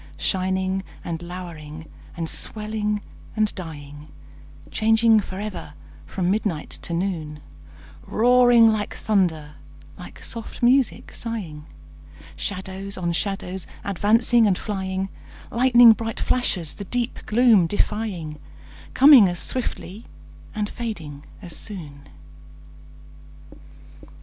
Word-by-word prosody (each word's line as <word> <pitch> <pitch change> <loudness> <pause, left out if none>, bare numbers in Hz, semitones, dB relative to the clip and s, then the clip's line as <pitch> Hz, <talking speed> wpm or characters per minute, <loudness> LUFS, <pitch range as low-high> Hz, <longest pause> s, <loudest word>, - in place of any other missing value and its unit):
Shining 190 0 -1 0.2
and 165 -1 -4
lowering 165 -3 -8 0.3
and 165 -1 -2
swelling 210 +2 0 0.3
and 215 -1 +1
dying, 150 -4 -9 0.6
Changing 225 0 +4
forever 200 0 -6 0.3
from 180 - -1
midnight 200 -7 -2
to - - -7
noon; 170 -4 -3 0.7
Roaring 245 0 +5
like 210 -1 -3
thunder, 170 -8 0 0.5
like - - -11
soft 230 +1 -6
music 255 +1 +2
sighing, 180 -11 -5 0.7
Shadows 190 - -5
on 175 -2 -1
shadows 190 0 -2 0.2
advancing 220 +4 +3
and 190 -3 +2
flying, 190 -2 -3 0.4
Lighning 240 -1 +7
bright 225 0 -5
flashes 185 -10 0
the 200 - -8
deep 245 +4 -2
gloom 220 -5 +5
defying, 185 -6 -2 0.6
Coming 270 -7 +8
as 175 -1 -3
swiftly 230 -4 -3 0.5
and 210 -1 -1
fading 165 - -6 0.2
as 170 -3 -6
soon. 150 -10 -7
195 Hz, 100 wpm, -23 LUFS, 170-225 Hz, 0.7 s, Coming